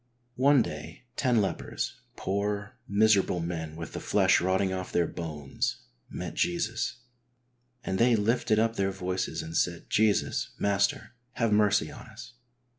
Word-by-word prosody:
One 135 -1 +5
day 75 +8 -8
ten 125 -5 +3
lepers, 95 - -3 0.2
poor, 100 +2 -2
miserable 100 -3 +3
men 80 -2 -4
with 85 -1 -7
the - - -4
flesh - - +3
rotting 95 +1 +1
off 95 -1 -4
their 85 - +2
bones, 75 -5 -4 0.3
met 90 - -5
Jesus, 170 -7 -1 0.8
"and 95 -4 -2
they 120 0 +5
lifted 110 0 +2
up 115 +1 +1
their 95 0 +1
voices 95 -3 -3
and 80 +1 -7
said, 85 -1 -1
Jesus, 110 -1 +1
Master, 100 +3 0 0.2
have 115 -3 +1
mercy 105 -6 +3
on - - -11
us. - - -11
100 Hz, 140 wpm, -28 LUFS, 85-110 Hz, 0.8 s, One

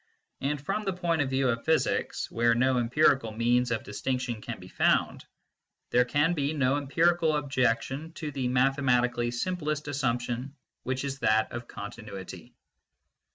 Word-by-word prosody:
And 145 +2 -1
from 210 +10 -2
the 195 -2 -1
point 170 -3 0
of 135 - 0
view 130 0 +1
of 115 -1 -1
physics, 160 -1 0
where 115 0 +3
no 130 +1 +3
empirical 125 -1 +3
means 120 +3 +2
of 115 -1 -1
distinction 120 +2 -3
can 115 -2 -6
be 90 - -11
found, - - +1 0.7
there 125 0 +4
can 145 +6 +2
be 145 -2 -1
no 135 -3 +2
empirical 160 +3 +2
objection 135 +2 -1
to 155 -3 -5
the 135 -3 -2
mathematically 125 -2 +2
simplest 150 +3 -2
assumption, 125 -1 -2 0.3
which 130 +1 -2
is 135 -1 -4
that 110 -3 +2
of 120 0 -6
continuity. 105 -2 -8
130 Hz, 150 wpm, -28 LUFS, 120-145 Hz, 0.7 s, there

